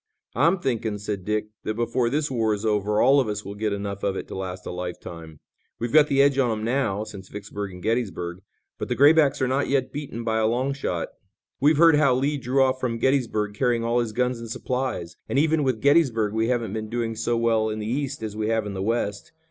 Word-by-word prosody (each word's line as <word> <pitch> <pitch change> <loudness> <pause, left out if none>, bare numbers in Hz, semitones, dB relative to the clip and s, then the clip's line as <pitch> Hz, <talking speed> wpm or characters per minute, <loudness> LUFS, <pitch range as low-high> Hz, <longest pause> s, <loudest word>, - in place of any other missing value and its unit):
"I'm 165 - +3
thinking," 115 - -2
said 100 -2 -5
Dick, 105 0 -1
"that 110 - -2
before 120 +1 0
this 145 +2 -1
war 110 -4 +1
is 105 +2 -6
over 105 0 +1
all 140 +1 +5
of 130 - +1
us 105 -1 -4
will 100 - -6
get 105 +1 -2
enough 100 0 -4
of 100 -1 -1
it - - -5
to - - -6
last 95 -1 -5
a - - -4
lifetime. 85 -3 -7 0.4
We've 120 +2 -4
got 150 -1 +7
the 140 -1 +4
edge 140 -1 +3
on 125 -3 +3
'em 110 -1 -2
now, 115 -5 0
since 100 -3 -10
Vicksburg 105 -1 -6
and 90 -1 -11
Gettysburg, 95 -6 -2 0.4
but - - -3
the - - 0
Graybacks 145 -1 +5
are - - +2
not 135 +3 0
yet 135 -2 0
beaten 140 -5 -5
by 110 -1 0
a 110 - +2
long 130 +4 0
shot. 90 -11 -3 0.5
We've 145 +2 +4
heard 165 -1 +6
how 140 -4 +4
Lee 140 +3 0
drew 130 +2 +2
off 130 0 +1
from 120 -3 -1
Gettysburg 115 -5 0
carrying 120 +1 +1
all 120 +1 +1
his 115 -2 -1
guns 125 +1 0
and 115 -1 -8
supplies, 120 -9 -3
and - - 0
even 155 +1 +3
with 130 -5 0
Gettysburg 130 -8 +3
we 110 +1 +1
haven't 115 -5 -1
been 110 -1 -4
doing 115 -1 -2
so 120 +2 0
well 115 -1 +2
in 110 - -3
the 105 - -4
East 130 +1 -3
as 105 -1 -4
we 110 0 -2
have 110 -1 +1
in 100 - -5
the 95 - -4
West. 105 +1 -2
115 Hz, 235 wpm, -24 LUFS, 105-130 Hz, 0.5 s, got